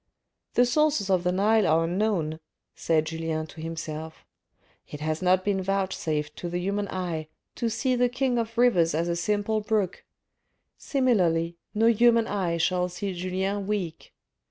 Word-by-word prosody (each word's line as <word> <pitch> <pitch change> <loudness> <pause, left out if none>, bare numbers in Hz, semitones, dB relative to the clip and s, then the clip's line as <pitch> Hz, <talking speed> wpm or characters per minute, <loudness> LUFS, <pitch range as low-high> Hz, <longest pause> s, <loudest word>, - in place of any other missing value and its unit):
"The 245 - +5
sources 285 -6 +2
of 180 -2 +2
the 180 - +1
Nile 210 +3 +3
are 160 +1 +3
unknown," 170 -3 0 0.3
said 160 -2 +1
Julien 160 -1 -3
to 160 +1 -11
himself: 160 -1 -6 0.3
" - - -38
it 150 - -8
has 155 +2 -2
not 185 0 +3
been 200 -2 +1
vouchsafed 180 -6 -2
to 175 - -4
the 175 - -2
human 200 +3 -1
eye 175 -5 -3 0.3
to 235 - -1
see 255 +3 0
the 245 0 +2
king 245 0 0
of 230 0 -4
rivers 180 -10 +4
as 165 +2 0
a 170 - 0
simple 205 +5 0
brook: 210 -3 -1 0.7
similarly, 180 - +1 0.2
no 220 +2 +3
human 230 0 +5
eye 185 -6 -1
shall 180 +2 +1
see 190 +2 -4
Julien 190 +2 -2
weak. 195 -6 -3
185 Hz, 160 wpm, -26 LUFS, 165-215 Hz, 0.7 s, The